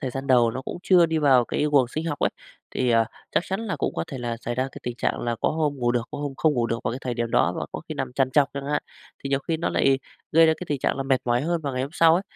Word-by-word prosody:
thời 130 - -3
gian 135 +2 -5
đầu 120 -3 +4
nó 130 +3 -5
cũng - - -6
chưa 180 -3 +5
đi 160 0 0
vào 135 -5 +5
cái 150 - -1
guồng 135 -4 +4
sinh 155 +6 -4
học 145 -3 -2
ấy, - - +1 0.4
thì, 125 -1 0
ờ, 115 -1 +4 0.3
chắc - - +2
chắn 190 +2 -2
là 220 -4 -3
cũng - - -2
có 80 - -2
thể 135 - -7
là 120 -1 -3
xảy 120 - -3
ra 130 - 0
cái - - -10
tình 120 -1 -4
trạng - - -1
là 120 -1 -2
có - - +2
hôm 150 -2 0
ngủ 120 -2 +1
được, 120 -1 +1
có 145 - -6
hôm 145 -2 -4
không 155 -2 +2
ngủ 120 -2 +1
được 115 0 -2
vào - - 0
cái 125 - -4
thời 125 -2 -3
điểm 120 -1 -2
đó - - +3
và - - -3
có - - -4
khi - - -4
nằm 130 -2 -4
trằn 130 0 +1
trọc 145 0 +4
chẳng 140 0 -5
hạn, 150 +1 0 0.4
thì - - -2
nhiều 135 - +2
khi 165 - +1
nó 170 - -1
lại 135 -1 +3 0.3
gây 165 +1 +7
ra 160 - +5
cái 180 - -7
tình 145 - -1
trạng - - 0
là 135 - -1
mệt 135 -1 +1
mỏi 120 0 +2
hơn 170 +2 0
vào 140 -3 -3
ngày 130 0 -1
hôm 135 - -4
sau 165 -1 +5
ấy. 180 - +1
135 Hz, 335 wpm, -24 LUFS, 120-155 Hz, 0.4 s, gây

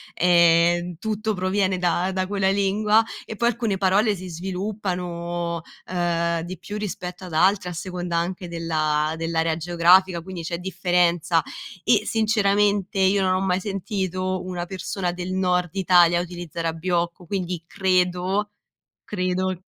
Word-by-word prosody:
ehm, 175 0 +4
tutto 215 0 -2
proviene 185 0 0
da 180 +1 0
da 185 0 -1
quella 195 -1 +1
lingua 205 +3 +3 0.2
e 220 - -8
poi 235 - +2
alcune 230 -4 0
parole 200 +3 +3
si 185 - -8
sviluppano, 175 -2 -3 0.2
ehm, 170 -2 0
di 180 +3 -6
più 205 +5 -7
rispetto 180 -3 -5
ad 180 - -9
altre, 185 +3 +3
a - - -5
seconda 175 0 -3
anche 180 +1 -3
della 155 -2 0
dell'area 165 0 0
geografica, 175 +2 +4
quindi 185 0 -7
c'è 170 +1 -3
differenza. 175 -2 +1 0.4
E 230 - +3
sinceramente, 205 -3 +1
io 190 +1 +3
non 185 -1 +2
ho 185 - +1
mai 185 0 +1
sentito 185 -2 -2
una 180 -1 -4
persona 185 0 -3
del 180 +1 -5
nord 180 -1 +1
Italia, 175 -2 +5
utilizzare 175 -1 -5
abbiocco, 170 +1 -2
quindi 180 -2 -3
credo 185 +2 0 0.5
credo 185 -1 -2
180 Hz, 135 wpm, -23 LUFS, 175-195 Hz, 0.5 s, Italia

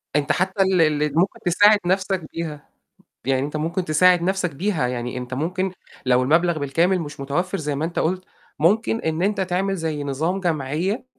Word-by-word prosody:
أنت 145 -1 +2
حتى 190 +2 0
ال 190 -2 +2 0.2
ال 150 - 0
ممكن 185 +3 +1
تساعد 205 +4 +5
نَفْسك 190 -1 0
بيها. 155 -3 -6 0.6
يعني 135 +1 +1
أنت 150 +1 -5
ممكن 170 +4 -2
تساعد 175 +3 +4
نَفْسك 185 -3 -1
بيها، 170 -4 0
يعني 125 0 -4
أنت 125 0 -6
ممكن 180 +6 -2 0.3
لو 125 0 +4
المَبلغ 165 +5 +2
بالكامل 170 +6 +1
مش 145 -3 -7
متوفِّر 175 +8 -2
زي 150 -2 -2
ما 145 +3 -2
أنت 170 - -3
قُلت، 185 +3 0 0.3
ممكن 215 +7 +2
إن 160 +1 -2
أنت 205 +1 +1
تعمل 190 +1 0
زي 155 -3 -3
نظام 160 +8 -1
جمعيّة 165 - -1
170 Hz, 175 wpm, -22 LUFS, 150-185 Hz, 0.6 s, تساعد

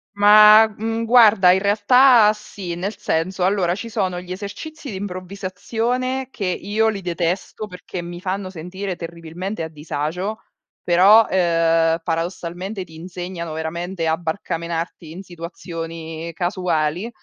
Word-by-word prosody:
Ma, 210 +1 +8
mhmm, 225 +2 -3
guarda 220 -6 +6
in 190 - +3
realtà 215 +2 +5
sì, 195 -4 -7
nel 195 +5 -4
senso 180 +3 -1
allora 185 -3 +1
ci 230 +4 -6
sono 185 -4 -1
gli 180 0 -10
esercizi 275 - -8
di 190 - -5
improvvisazione 205 +7 -3
che 205 -6 -5
io 205 +5 0
li 200 -2 -4
detesto 175 +4 -3
perché 180 -1 -7
mi 175 0 -7
fanno 190 0 -3
sentire 185 +2 -5
terribilmente 170 +3 -6
a 160 - -5
disagio, 160 +7 -4 0.4
però, 195 +6 +6
ehm, 165 -2 +2
paradossalmente 175 +3 -4
ti 165 -2 -16
insegnano 175 -1 -6
veramente 170 +2 -4
a 160 0 +1
barcamenarti 170 -1 -4
in 185 +4 -8
situazioni 165 -1 -7
casuali 175 +1 -1
185 Hz, 130 wpm, -21 LUFS, 170-205 Hz, 0.4 s, Ma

